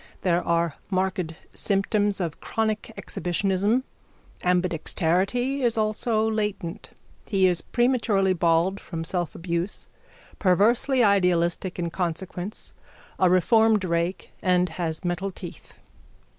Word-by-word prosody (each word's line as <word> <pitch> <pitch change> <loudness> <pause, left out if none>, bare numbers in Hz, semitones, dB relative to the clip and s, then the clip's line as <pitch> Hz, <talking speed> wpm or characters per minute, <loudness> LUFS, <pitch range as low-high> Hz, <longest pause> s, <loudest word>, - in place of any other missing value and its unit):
There 175 -1 +2
are 170 -3 0
marked 185 -3 -1 0.2
symptoms 205 0 +1
of 170 -4 -3
chronic 220 0 -2
exhibitionism. 195 +7 0 0.6
Ambidexterity 185 - +1
is 235 -3 +1
also 220 +1 +1
latent. 210 -4 -3 0.4
He 195 -3 +3
is 175 -3 +2
prematurely 225 -6 +2
bald 175 +2 +2
from 165 -2 -6
selfabuse, 170 +1 -2 0.5
perversely 230 +7 +3
idealistic 180 -3 +2
in 170 -1 -2
consequence, 180 +3 -4 0.5
a 185 - +5
reformed 220 +3 +4
rake, 170 +1 -1
and 180 -1 +2
has 160 0 -4
metal 175 +3 -1
teeth. 190 - -11
185 Hz, 105 wpm, -25 LUFS, 175-215 Hz, 0.6 s, a